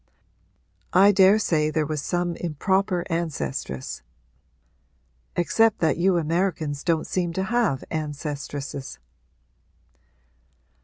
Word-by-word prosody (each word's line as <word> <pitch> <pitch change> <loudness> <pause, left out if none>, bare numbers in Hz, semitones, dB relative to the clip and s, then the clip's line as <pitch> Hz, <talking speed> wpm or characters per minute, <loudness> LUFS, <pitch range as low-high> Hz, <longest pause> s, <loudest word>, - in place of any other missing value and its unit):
I 195 +2 +7
daresay 190 -5 +4
there 155 0 0
was 150 -1 -3
some 175 +2 -1
improper 180 +3 0
ancestress 145 - -3 1.3
except 225 +5 +3
that 155 -4 +1
you 185 0 +3
Americans 160 -3 -1
don't 165 -2 +1
seem 175 -2 -1
to 190 - -1
have 215 - 0
ancestresses.' 145 - -5
170 Hz, 90 wpm, -24 LUFS, 150-190 Hz, 1.3 s, I